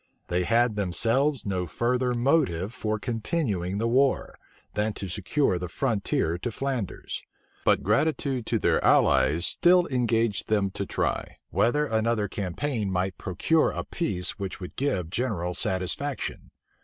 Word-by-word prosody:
They 90 0 +1
had 115 +3 +3
themselves 115 - +1
no 90 -3 -1
further 125 +5 0
motive 120 - +1
for 110 -3 -2
continuing 105 - -2
the 115 +2 0
war, 130 +3 +2 0.4
than 105 +1 0
to 100 - -5
secure 105 - 0
a 90 - -1
good 90 -1 -5
frontier 100 - 0
to 120 - -3
Flanders; 130 -4 -3 0.4
but - - +3
gratitude 130 +2 +1
to - - +1
their - - +2
allies 85 +5 +4
still 180 0 +4
engaged 115 -5 +1
them 100 -3 +1
to - - -4
try, - - -2
whether 145 +6 +2
another 110 -3 +1
campaign 105 +4 -2
might 90 0 -1
procure 150 - +2
a - - -4
peace 100 - -3
which 95 -1 -4
would 90 - -8
give 95 - -1
general 95 -7 -1
satisfaction. 95 +11 -2
110 Hz, 145 wpm, -27 LUFS, 95-130 Hz, 0.4 s, allies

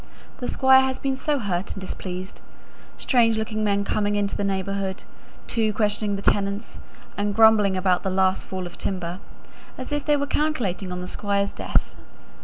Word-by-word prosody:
The 250 - -3
Squire 265 0 +6
has 265 0 -1
been 270 -1 -1
so 290 +2 0
hurt 195 -6 -2
and - - -7
displeased: 185 0 -6 0.6
strange 230 -3 +3
looking 220 0 -2
men 200 -1 +1
coming 205 0 0
into 205 -1 0
the - - -2
neighbourhood, 195 0 -2 0.4
too, 220 -2 0
questioning 205 -1 0
the 200 - -6
tenants, 200 +2 0 0.4
and 205 0 -1
grumbling 215 -3 +5
about 185 -1 +2
the 190 - -2
last 190 0 +1
fall 185 -1 -4
of 175 - -10
timber, 180 -2 -3 0.6
as 255 - -7
if 290 -1 -1
they 295 0 +3
were 285 - -1
calculating 240 - -1
on 180 0 -4
the 180 - -5
Squire's 200 +1 -1
death." - - -1
205 Hz, 175 wpm, -24 LUFS, 190-225 Hz, 0.6 s, Squire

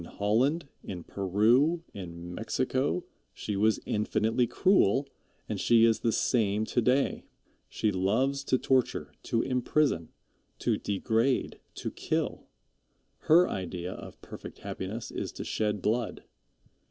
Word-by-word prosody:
In - - -9
Holland, 125 - +1 0.2
in 90 -3 -6
Peru, 115 - +2
in 85 -2 -7
Mexico, 130 - -1 0.3
she 105 - -4
was 110 +2 +3
infinitely 110 +3 +1
cruel, 140 - +3 0.4
and - - -3
she 115 -1 +5
is 115 -1 +3
the 115 - +1
same 110 -3 +1
to 120 - 0
day. 125 +4 +1 0.4
She 110 - 0
loves 120 +9 +1
to 130 - +2
torture, 130 -1 +1
to 115 - 0
imprison, 125 - +1 0.5
to - - 0
degrade, 115 +6 0 0.2
to - - -4
kill. - - -2 0.8
Her 175 +3 +7
idea 90 -1 -4
of - - -10
perfect - - -9
happiness 105 +5 -5
is - - -4
to - - -6
shed 105 -3 -1
blood. 115 +1 -1
115 Hz, 130 wpm, -29 LUFS, 100-130 Hz, 0.8 s, Her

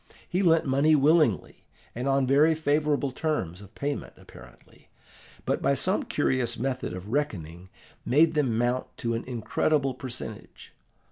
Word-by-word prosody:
He 180 - 0
lent 165 -3 +3
money 140 +3 +3
willingly, 150 - +2 0.3
and 125 +3 -4
on 135 -1 +2
very 145 +5 +4
favourable 150 -2 0
terms 115 - -3
of 100 +1 -15
payment 145 0 -4
apparently, - - -17 0.6
but, - - 0
by - - +2
some - - +1
curious 120 -2 0
method 130 -3 -3
of 95 +3 -8
reckoning, 95 - -3 0.3
made 155 +6 +3
them 135 -8 +1
mount 120 +2 0
to 115 0 -2
an 115 - -3
incredible 130 +4 0
percentage. 125 -4 -8
130 Hz, 140 wpm, -27 LUFS, 115-150 Hz, 0.6 s, very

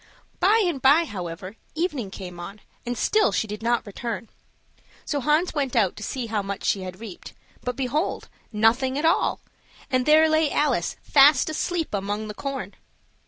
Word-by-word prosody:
By 430 +4 +4
and 325 -7 -1
by, 290 +6 +5
however, 185 - -7 0.2
evening 300 - -2
came 180 -2 -8
on, 200 +4 -8 0.3
and 245 0 -2
still 430 - +3
she - - 0
did 210 0 -7
not 235 +1 +1
return; 225 +2 -5 0.8
so 290 - -1
Hans 300 +6 +2
went 275 -4 -1
out 205 -6 +2
to - - -10
see 250 +3 -3
how 220 -2 -1
much 200 0 -5
she 195 - +1
had 185 0 -7
reaped; 215 -5 -9 0.3
but, 250 -1 -2
behold, 275 +6 -2 0.2
nothing 240 +5 +2
at 300 - -1
all, 325 - +2 0.5
and 255 0 +1
there 310 +1 +6
lay 315 -1 +3
Alice 265 - +1
fast 285 +1 +5
asleep 330 -1 -2
among 205 +2 -2
the - - -5
corn! 275 +4 -5
250 Hz, 170 wpm, -24 LUFS, 210-300 Hz, 0.8 s, there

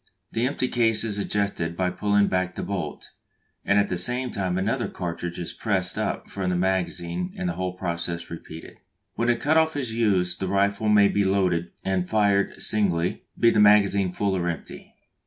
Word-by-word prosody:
The 115 +2 0
empty 130 -1 -1
case 115 -3 +1
is 105 -3 -2
ejected 100 -5 -2
by 90 -1 0
pulling 100 +2 +2
back 90 -1 -1
the - - -4
bolt, 90 -7 -5 0.5
and 100 - +2
at 100 0 +3
the 90 - -2
same 125 +7 +4
time 95 -2 -2
another 115 +7 -1
cartridge 85 -1 -5
is 85 - -5
pressed - - -1
up - - -3
from 95 -2 -3
the 90 - 0
magazine 90 - -1
and 185 -1 -2
the 175 - -1
whole 95 0 -3
process 85 -2 -4
repeated. 80 -1 -10 0.4
When 115 +2 -1
the 120 - +4
cut 145 +7 +1
off 160 -1 +2
is 130 -6 -3
used 100 -6 +1
the 95 - -2
rifle 100 +2 +1
may 105 -1 +6
be 100 0 +1
loaded 95 -3 +1 0.2
and 95 -2 -1
fired 100 -2 +1
singly, 90 -5 +1
be 115 - +5
the 110 - +2
magazine 100 -2 +4
full 100 +1 -1
or 90 -1 -1
empty. 85 - -8
100 Hz, 190 wpm, -25 LUFS, 90-110 Hz, 0.5 s, may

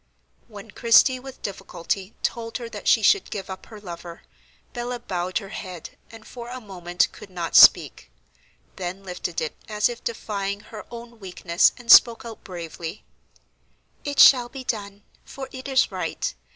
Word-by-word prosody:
When 210 -1 -12
Christie 240 +3 +4
with 265 0 -12
difficulty 195 0 -4
told 230 -1 -2
her 240 -2 -7
that - - -8
she - - +4
should 405 - +4
give 195 -1 -6
up 190 - -9
her 215 -2 -11
lover, 170 -3 -9 0.5
Bella 245 0 -4
bowed 185 -5 -3
her 195 -3 -5
head, 185 -5 -8 0.2
and 225 -1 -14
for 240 -1 -9
a 255 +1 -6
moment 180 -5 -1
could 210 - -13
not 175 -2 -5
speak, 65 - +6 0.7
then 185 +1 -5
lifted 180 -2 -4
it 155 - -4
as 210 +1 +1
if 240 0 -8
defying 200 -3 -4
her 215 0 -11
own 235 -1 -11
weakness, 180 -3 +2
and 245 -2 0
spoke 235 -1 +7
out 225 -2 -9
bravely: 170 0 -7 1.0
"It 285 -1 -3
shall 245 -4 +7
be 270 0 -8
done, 205 -4 -5 0.2
for 265 -1 -8
it 260 0 -8
is 265 -1 +2
right. - - -3
210 Hz, 165 wpm, -24 LUFS, 185-240 Hz, 1.0 s, spoke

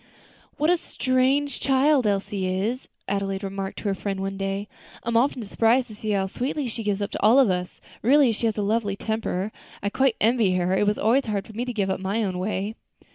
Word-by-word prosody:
"What 305 +4 +3
a 355 - +4
strange 270 0 0
child 270 -2 +3
Elsie 200 -1 -1
is?" 205 +8 -2 0.2
Adelaide 195 0 -2
remarked 195 0 -4
to - - -7
her 200 -2 +1
friend 195 0 -3
one 195 0 -3
day. 195 +1 -3 0.4
"I 235 - -3
am 235 - -1
often 250 0 +2
surprised 230 +4 +2
to 215 - -9
see 215 +1 -5
how 200 -2 +1
sweetly 260 +7 -2
she 225 - -5
gives 205 -1 -1
up 200 - -4
to - - -4
all 220 +5 +6
of 260 -8 +5
us; 180 0 -3 0.2
really 270 +1 +5
she 225 +1 -1
has 220 - -1
a 210 - 0
lovely 205 -1 0
temper. 215 -2 -2 0.3
I 200 - 0
quite 265 0 +2
envy 220 -4 +3
her; 180 +1 +1
it 205 - +2
was 210 - +2
always 245 +4 +2
hard 205 -2 -1
for 220 - -12
me 235 +3 -3
to 250 - -3
give 200 -4 0
up 190 - -2
my 200 +4 -1
own 185 -3 -2
way." 200 +2 -2
210 Hz, 230 wpm, -25 LUFS, 195-245 Hz, 0.4 s, all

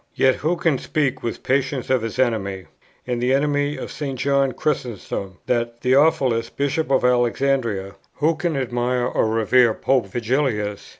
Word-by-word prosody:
Yet 130 -1 +3
who 160 +4 0
can 165 -6 +1
speak 145 -5 -1
with 115 - -4
patience 130 -1 0
of 130 -3 +3
his 115 +1 -5
enemy 100 -7 -1 0.4
and 125 -1 -2
the 125 +2 +3
enemy 145 0 0
of - - -6
St. 140 -3 -4
John 140 +1 +2
Chrysostom, 115 - -3
that 120 -1 -1
Theophilus, 130 -3 +3
bishop 140 +2 -1
of 135 -2 +2
Alexandria? 120 -5 +1 0.2
who 155 +3 +2
can 160 -2 -2
admire 125 -1 -1
or 125 - +1
revere 115 +1 +3
Pope 130 -6 +1
Vigilius? 110 -2 -1
125 Hz, 155 wpm, -22 LUFS, 115-140 Hz, 0.4 s, Yet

